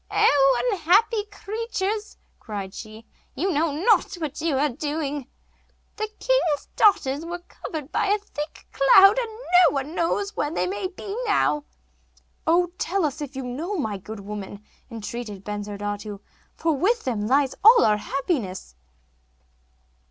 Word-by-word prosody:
'Oh, 270 -3 +4
unhappy 410 +5 +3
creatures,' 425 0 -4 0.2
cried 200 -4 -6
she, 220 +1 -10 0.3
'you 370 +8 0
know 315 0 +1
not 370 +8 +2
what 310 -5 -5
you 315 -4 +1
are 290 +3 +3
doing! 290 0 -3 0.7
The 430 - -2
king's 425 -13 +1
daughters 295 -8 +3
were 345 +1 -4
covered 305 -3 -7
by - - +1
a 410 +1 +3
thick 305 -7 -8
cloud, 390 - +7
and 475 -2 -2
no 360 -8 +3
one 275 +3 -3
knows 400 +5 -1
where 295 - -1
they 320 - -1
may 375 0 -3 0.4
now 400 -7 +2
be.' 295 - -22 0.8
'Oh, 350 +2 +3
tell 380 -2 0
us, 300 +1 -3
if 285 -1 -6
you 265 - -4
know, 310 +11 -4
my 215 - -2
good 210 +2 -8
woman,' 205 0 -7 0.2
entreated 225 -3 -6
Bensurdatu, 205 0 -5 0.4
'for 325 -1 +1
with 450 - +1
them 215 -5 -2
lies 270 +2 +3
all 460 +3 +8
our 210 -1 +3
happiness. 225 - -3
295 Hz, 145 wpm, -24 LUFS, 235-385 Hz, 0.8 s, all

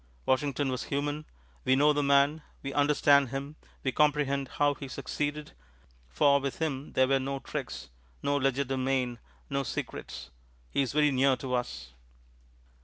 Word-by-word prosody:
Washington 140 +1 +1
was 130 -1 -3
human. 145 +2 -2 0.4
We 130 - +4
know 150 +2 +5
the 145 - +1
man; 140 +2 +3 0.2
we 135 0 -4
understand 145 -2 +4
him; 140 +3 -5 0.3
we 135 - +1
comprehend 145 -2 +2
how 145 0 +3
he 140 -1 -8
succeeded, 145 +3 -4 0.6
for 140 - +4
with 140 -1 -3
him 145 -3 -3
there 130 0 +4
were 135 0 +3
no 135 +1 -3
tricks, 65 - -6 0.3
no 145 - +1
legerdemain, 130 -2 0 0.3
no 140 0 +1
secrets. 120 - -6 0.4
He - - +2
is 135 -2 -1
very 150 0 +4
near 135 0 +3
to 125 +1 -5
us. 75 - -3
140 Hz, 150 wpm, -29 LUFS, 130-145 Hz, 0.6 s, know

